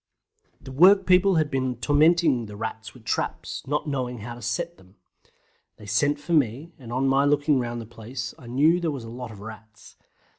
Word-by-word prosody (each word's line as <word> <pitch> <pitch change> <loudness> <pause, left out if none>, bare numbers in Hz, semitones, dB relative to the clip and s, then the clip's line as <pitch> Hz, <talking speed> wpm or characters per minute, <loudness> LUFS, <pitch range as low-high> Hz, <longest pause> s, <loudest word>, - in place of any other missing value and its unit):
The 130 - -11
workpeople 185 +4 +5
had 155 -2 +1
been 130 -1 -1
tormenting 145 0 +3
the 105 - -9
Rats 110 +1 -6
with - - -16
traps, - - -3
not 150 +2 -1
knowing 125 -5 -3
how 120 +3 -6
to 120 - -11
set 170 +5 -3
them. 95 +1 -21 0.8
They 105 - -13
sent 145 +8 +1
for 170 +4 -4
me, 145 +3 +1
and 120 -3 -10
on 130 +2 0
my 135 +1 +3
looking 145 0 +2
round 120 -1 -3
the 115 - -7
place 115 +1 -7
I 120 - -13
knew 150 +8 +3
there 170 -2 -1
was 140 -5 -5
a 115 - -9
lot 125 0 -7
of 105 -3 -11
Rats. 110 0 -12
130 Hz, 195 wpm, -25 LUFS, 115-150 Hz, 0.8 s, workpeople